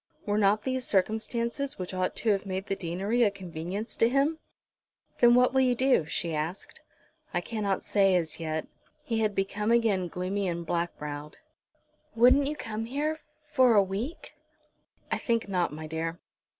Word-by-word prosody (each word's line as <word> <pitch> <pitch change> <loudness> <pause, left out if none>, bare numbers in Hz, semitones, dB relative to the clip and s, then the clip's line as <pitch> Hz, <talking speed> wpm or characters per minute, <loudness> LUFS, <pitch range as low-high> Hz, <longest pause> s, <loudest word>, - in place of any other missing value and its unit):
Were 205 0 +1
not 210 +1 +3
these 260 -1 -2
circumstances 230 +6 0
which 185 0 -5
ought 185 0 -1
to 225 - +2
have 195 -1 +1
made 190 0 -3
the 195 - -2
deanery 190 +7 -1
a 225 - +5
convenience 185 +2 -5
to 230 - +4
him? 280 +5 +1 0.8
"Then 240 0 +7
what 250 +1 +4
will 265 - +4
you 250 -1 +3
do?" 255 - +3
she 165 +1 -2
asked. 155 +5 -4 0.5
"I - - +3
cannot 205 -1 -2
say 195 -2 +3
as 165 -3 -1
yet." 160 -1 -3 0.4
He 230 -2 -1
had 215 -2 0
become 200 +2 -1
again 220 -6 +2
gloomy 185 +3 -2
and 170 -1 -3
black 170 +1 -2
browed. 150 0 -7 0.8
"Wouldn't 255 +4 +5
you 300 - -2
come 225 -5 -4
here 295 +6 -2 0.3
for 255 -5 +5
a 200 - +6
week?" 205 - -5 0.8
"I - - 0
think 230 -2 0
not, 180 -3 0
my 155 +1 -7
dear." 165 +2 -4
205 Hz, 170 wpm, -28 LUFS, 180-235 Hz, 0.8 s, Then